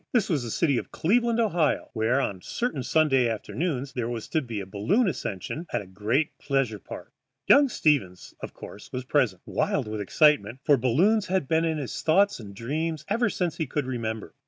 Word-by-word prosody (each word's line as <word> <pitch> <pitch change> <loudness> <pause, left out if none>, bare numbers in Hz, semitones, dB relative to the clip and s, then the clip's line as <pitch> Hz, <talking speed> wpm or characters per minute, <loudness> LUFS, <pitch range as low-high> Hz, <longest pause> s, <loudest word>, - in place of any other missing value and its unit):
This 230 -5 +2
was 150 -5 +1
the 120 - -5
city 140 +1 +1
of - - -9
Cleveland, 235 +6 +1
Ohio, 175 -9 +1
where 115 +3 +1
on 100 -8 -1
a - - -20
certain 235 - -3
Sunday 135 -3 +3
afternoon 135 +5 -2
there 120 -2 -2
was 115 -2 -5
to 160 - +1
be 115 -6 -5
a 100 - -5
balloon 110 - +1
ascension 140 - -4
at - - 0
the 100 - -8
great 105 +10 -1
pleasure 135 -7 -1
park. - - -10 0.3
Young 280 -1 +6
Stevens, 125 - 0
of - - -7
course, 105 - -11
was 125 -1 -4
present, 125 -10 +1
wild - - -1
with 105 -1 -4
excitement, 115 - +3
for 145 - +5
balloons 170 - +2
had 185 -5 0
been 160 +2 +2
in 160 -1 0
his 140 -4 -4
thoughts 195 +3 +3
and 100 -3 -10
dreams 155 +7 -3
ever 230 +3 +2
since 175 -4 -2
he 160 - -2
could 145 +1 -2
remember. 115 -4 -4
140 Hz, 200 wpm, -26 LUFS, 115-165 Hz, 0.3 s, Young